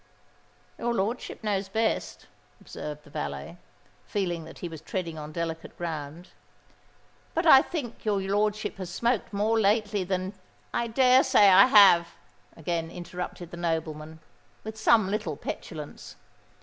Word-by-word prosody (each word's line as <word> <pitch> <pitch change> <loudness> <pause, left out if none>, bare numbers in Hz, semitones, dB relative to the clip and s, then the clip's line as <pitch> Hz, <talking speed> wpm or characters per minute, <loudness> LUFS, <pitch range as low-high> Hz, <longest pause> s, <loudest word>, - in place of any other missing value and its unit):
"Your 235 0 -1
lordship 225 +4 -3
knows 200 -2 -1
best," 220 +3 -1 0.3
observed 150 0 -8
the 145 - -17
valet, 70 - -5 0.5
feeling 175 - -2
that 165 - -12
he 175 - -5
was 160 -3 -9
treading 165 -2 -4
on 150 0 -7
delicate 165 0 -5
ground. 165 0 -6 1.1
"But 335 +2 0
I 270 -5 +9
think 270 -9 -6
your 210 -2 +1
lordship 210 +2 -1
has 185 -2 -6
smoked 235 +4 -1
more 215 +3 +1
lately 210 -1 +2
than——" 185 +1 -2 0.4
"I 235 - 0
dare 255 +2 +5
say 205 -1 +6
I 195 +5 +8
have," 190 -7 +6 0.4
again 165 0 -2
interrupted 175 0 -7
the 175 - -8
nobleman, 160 -2 -3 0.4
with 220 0 -6
some 220 -2 +4
little 190 -9 -2
petulance. 150 -3 -7
190 Hz, 135 wpm, -27 LUFS, 165-215 Hz, 1.1 s, I